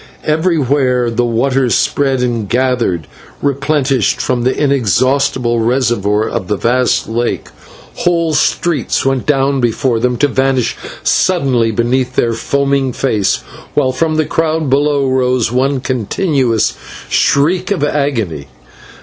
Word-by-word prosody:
Everywhere 140 Hz, -7 st, +1 dB
the 120 Hz, +1 st, 0 dB
waters 125 Hz, +2 st, +1 dB
spread 135 Hz, -3 st, +1 dB
and 115 Hz, -5 st, -2 dB
gathered, 120 Hz, -, 0 dB, 0.3 s
replenished 140 Hz, -3 st, 0 dB
from 125 Hz, -2 st, -1 dB
the 130 Hz, +2 st, 0 dB
inexhaustible 130 Hz, -2 st, +1 dB
reservoir 115 Hz, -3 st, +1 dB
of 110 Hz, -6 st, -4 dB
the 105 Hz, -, 0 dB
vast 125 Hz, +3 st, +1 dB
lake. 120 Hz, +2 st, -2 dB, 0.5 s
Whole 170 Hz, -2 st, +1 dB
streets 150 Hz, -3 st, 0 dB
went 135 Hz, -1 st, 0 dB
down 135 Hz, -2 st, +1 dB
before 120 Hz, 0 st, 0 dB
them, 125 Hz, +1 st, 0 dB
to 145 Hz, -, +2 dB
vanish 130 Hz, -2 st, 0 dB, 0.3 s
suddenly 135 Hz, -11 st, +2 dB
beneath 125 Hz, +3 st, -1 dB
their 115 Hz, -1 st, +1 dB
foaming 140 Hz, +2 st, 0 dB
face, 105 Hz, -8 st, 0 dB, 0.3 s
while 130 Hz, -, +2 dB
from 155 Hz, +4 st, -1 dB
the 155 Hz, 0 st, +1 dB
crowd 160 Hz, -3 st, -1 dB
below 145 Hz, 0 st, +2 dB
rose 125 Hz, -3 st, +1 dB
one 135 Hz, +2 st, +1 dB
continuous 130 Hz, -, 0 dB, 0.3 s
shriek 160 Hz, +6 st, +1 dB
of 195 Hz, -7 st, -1 dB
agony. 115 Hz, -, -1 dB
130 Hz, 125 wpm, -14 LUFS, 120-140 Hz, 0.5 s, to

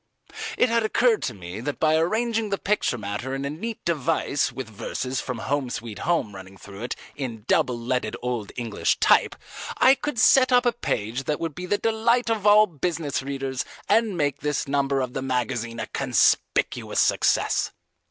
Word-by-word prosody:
It 250 Hz, -, +4 dB
had 230 Hz, 0 st, +2 dB
occurred 225 Hz, +1 st, +2 dB
to 125 Hz, -, -2 dB
me 90 Hz, +1 st, -8 dB
that 145 Hz, +5 st, -4 dB
by 155 Hz, 0 st, +3 dB
arranging 220 Hz, +6 st, 0 dB
the 200 Hz, -, 0 dB
picture 200 Hz, -12 st, 0 dB
matter 105 Hz, +5 st, -4 dB
in 135 Hz, +1 st, -4 dB
a 140 Hz, -, -2 dB
neat 220 Hz, +9 st, -6 dB
device 155 Hz, -2 st, 0 dB
with 130 Hz, -3 st, -6 dB
verses 125 Hz, +4 st, -4 dB
from 125 Hz, -2 st, -4 dB
"Home 135 Hz, +2 st, -2 dB
Sweet 110 Hz, -3 st, -6 dB
Home" 165 Hz, -12 st, 0 dB
running 95 Hz, 0 st, -11 dB
through 100 Hz, +1 st, -11 dB
it 120 Hz, -, -3 dB, 0.2 s
in 115 Hz, -6 st, -6 dB
double 130 Hz, -6 st, +2 dB
leaded 120 Hz, -2 st, -2 dB
old 120 Hz, -4 st, -3 dB
English 115 Hz, -4 st, 0 dB
type, -, -, +4 dB, 0.4 s
I 260 Hz, -, +7 dB
could 275 Hz, -1 st, -4 dB
set 255 Hz, +3 st, +5 dB
up 250 Hz, 0 st, +4 dB
a 240 Hz, -, +4 dB
page 125 Hz, -, -3 dB
that 150 Hz, -, -1 dB
would 165 Hz, -2 st, -3 dB
be 180 Hz, +4 st, -7 dB
the 205 Hz, -, +1 dB
delight 225 Hz, +2 st, +1 dB
of 210 Hz, -2 st, 0 dB
all 210 Hz, +1 st, +7 dB
business 165 Hz, -4 st, -2 dB
readers 135 Hz, -1 st, -3 dB, 0.2 s
and 225 Hz, -5 st, +2 dB
make 145 Hz, -3 st, 0 dB
this 150 Hz, -1 st, -2 dB
number 140 Hz, -1 st, +1 dB
of 125 Hz, -1 st, -3 dB
the 135 Hz, -, -3 dB
magazine 125 Hz, -3 st, -2 dB
a 110 Hz, -, -2 dB
conspicuous 125 Hz, -3 st, +1 dB
success. -, -, +2 dB
140 Hz, 180 wpm, -24 LUFS, -, 0.4 s, I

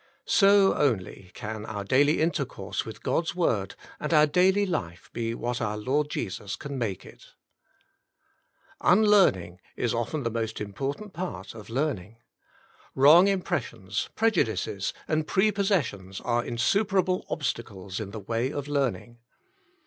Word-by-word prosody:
So 200 Hz, -1 st, +5 dB
only, 100 Hz, -9 st, -1 dB
can 110 Hz, -2 st, -5 dB
our 105 Hz, -2 st, -4 dB
daily 145 Hz, +9 st, +3 dB
intercourse 140 Hz, -, -2 dB
with 110 Hz, -, -9 dB
God's 165 Hz, +1 st, 0 dB
Word, 105 Hz, -, 0 dB, 0.2 s
and 150 Hz, -, -3 dB
our 150 Hz, 0 st, +7 dB
daily 185 Hz, +6 st, +3 dB
life 85 Hz, -, -4 dB
be 115 Hz, -1 st, -2 dB
what 120 Hz, 0 st, -3 dB
our 105 Hz, -2 st, -1 dB
Lord 140 Hz, +7 st, 0 dB
Jesus 100 Hz, -5 st, -4 dB
can 140 Hz, -2 st, -7 dB
make 105 Hz, -6 st, -3 dB
it. -, -, -16 dB, 1.5 s
Teachableness -, -, -26 dB
89 180 Hz, -, +5 dB
"Unlearning 100 Hz, -, +3 dB
is 120 Hz, -, -1 dB
often 120 Hz, +5 st, -2 dB
the 115 Hz, -, -1 dB
most 115 Hz, -1 st, -3 dB
important 135 Hz, -, -5 dB
part 100 Hz, -, -5 dB
of 110 Hz, -1 st, -11 dB
learning: 115 Hz, -, -2 dB, 0.8 s
wrong 155 Hz, +8 st, +7 dB
impressions, 115 Hz, -, -2 dB
prejudices 115 Hz, -, 0 dB, 0.2 s
and 155 Hz, -1 st, 0 dB
pre 205 Hz, +2 st, +3 dB
possessions 140 Hz, -, -1 dB
are 120 Hz, -1 st, 0 dB
insuperable 185 Hz, -, +1 dB
obstacles 110 Hz, -, -4 dB
in 105 Hz, -3 st, -5 dB
the 110 Hz, +2 st, -7 dB
way 115 Hz, +6 st, -1 dB
of 145 Hz, -1 st, -4 dB
learning. 135 Hz, -4 st, -2 dB
125 Hz, 140 wpm, -27 LUFS, 105-170 Hz, 1.5 s, our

